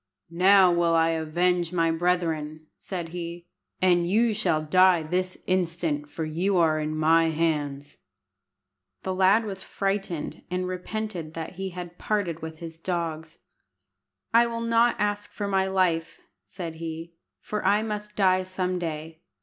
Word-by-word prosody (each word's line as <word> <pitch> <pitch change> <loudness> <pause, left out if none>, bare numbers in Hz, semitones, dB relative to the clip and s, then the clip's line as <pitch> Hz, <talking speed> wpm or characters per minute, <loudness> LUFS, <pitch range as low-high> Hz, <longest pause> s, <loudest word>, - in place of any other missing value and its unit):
"Now 185 +1 +6
will 170 -1 +2
I 165 0 +4
avenge 170 +2 0
my 165 -2 +2
brethren," 165 -3 -1
said 175 -4 -5
he, 170 0 -6 0.4
"and 175 -2 +3
you 225 +3 +3
shall 170 -7 +1
die 180 +1 +4
this 185 +3 -2
instant, 165 -5 -1
for 160 - -4
you 180 +5 0
are 160 -2 +3
in 155 0 -2
my 165 +1 +4
hands." 150 -3 -1 1.0
The 190 - -2
lad 190 +4 +4
was 195 -2 -5
frightened, 195 -6 -3
and 180 0 -2
repented 185 -3 -5
that 165 -1 -5
he 190 +1 -5
had 175 -1 -8
parted 185 -6 -1
with 160 0 -7
his 165 0 -9
dogs. 165 -3 -3 1.0
"I 235 +1 +6
will 230 0 -4
not 230 +1 +3
ask 205 +1 -2
my 195 -2 +1
life," 180 -4 0 0.2
said 170 -4 -7
he, 165 +1 -6 0.3
"for 210 - -4
I 205 +2 +3
must 210 -1 -5
die 185 -2 +3
some 185 -1 -2
day. 160 -1 -5
175 Hz, 145 wpm, -26 LUFS, 165-190 Hz, 1.0 s, Now